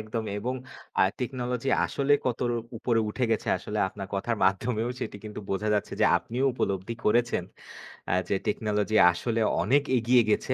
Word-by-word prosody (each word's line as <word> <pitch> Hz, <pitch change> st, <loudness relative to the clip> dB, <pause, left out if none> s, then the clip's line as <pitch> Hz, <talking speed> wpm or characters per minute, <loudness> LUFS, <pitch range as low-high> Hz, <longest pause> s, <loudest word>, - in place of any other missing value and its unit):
একদমই 110 Hz, -1 st, -4 dB
এবং 125 Hz, +4 st, -2 dB, 0.5 s
আ -, -, +6 dB, 0.2 s
টেকনোলজি 125 Hz, 0 st, -2 dB, 0.2 s
আসলে 140 Hz, +1 st, 0 dB
কত 125 Hz, -2 st, -1 dB
র -, -, 0 dB, 0.3 s
উপরে 115 Hz, -1 st, +1 dB
উঠে 125 Hz, +3 st, -1 dB
গেছে 110 Hz, -, 0 dB
আসলে 105 Hz, +3 st, -5 dB
আপনার 95 Hz, 0 st, -8 dB
কথার 115 Hz, +4 st, -1 dB
মাধ্যমেও 110 Hz, +4 st, +1 dB
সেটি 105 Hz, -, -4 dB
কিন্তু 105 Hz, 0 st, -6 dB
বোঝা 100 Hz, +2 st, -1 dB
যাচ্ছে। 105 Hz, -, -1 dB
যে -, -, +6 dB
আপনিও 125 Hz, +4 st, -3 dB
উপলব্ধি 100 Hz, +1 st, -2 dB
করেছেন। 120 Hz, -4 st, +2 dB, 0.9 s
যে 100 Hz, -, +2 dB
টেকনোলজি 105 Hz, 0 st, 0 dB
আসলে 115 Hz, +5 st, -2 dB, 0.2 s
অনেক 140 Hz, +2 st, +3 dB
এগিয়ে 120 Hz, +1 st, +4 dB
গেছে। 130 Hz, -, +1 dB
115 Hz, 160 wpm, -27 LUFS, 105-125 Hz, 0.9 s, আ